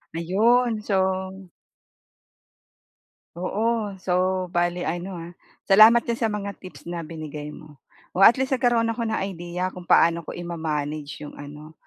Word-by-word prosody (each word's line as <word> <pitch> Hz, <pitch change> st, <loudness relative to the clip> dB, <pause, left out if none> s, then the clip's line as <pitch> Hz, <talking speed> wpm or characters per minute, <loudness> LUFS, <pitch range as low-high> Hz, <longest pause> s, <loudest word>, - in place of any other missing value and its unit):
Ayun 220 Hz, +7 st, +2 dB
so 190 Hz, -1 st, -1 dB, 1.9 s
Oo, 210 Hz, +2 st, -1 dB
so 185 Hz, 0 st, 0 dB
bale 175 Hz, +1 st, 0 dB
ano 175 Hz, +2 st, -4 dB
ha 170 Hz, +1 st, -9 dB, 0.3 s
salamat 215 Hz, +4 st, +7 dB
din 235 Hz, -, -1 dB
sa 230 Hz, -1 st, -1 dB
mga 200 Hz, -1 st, -4 dB
tips 185 Hz, -2 st, -13 dB
na 170 Hz, -1 st, -4 dB
binigay 155 Hz, -2 st, -7 dB
mo. 150 Hz, -2 st, -13 dB, 0.3 s
O, 190 Hz, -, -1 dB
at 235 Hz, +6 st, +8 dB
least 265 Hz, 0 st, 0 dB
nagkaroon 240 Hz, -3 st, +2 dB
ako 230 Hz, -1 st, -3 dB
ng 220 Hz, -, -1 dB
idea 180 Hz, 0 st, -4 dB
kung 180 Hz, -1 st, -11 dB
paano 170 Hz, 0 st, +4 dB
ko 160 Hz, -, -8 dB
i-ma-manage 155 Hz, -4 st, -4 dB
'yong 145 Hz, -, -10 dB
ano 150 Hz, +2 st, -11 dB
185 Hz, 140 wpm, -24 LUFS, 170-215 Hz, 1.9 s, at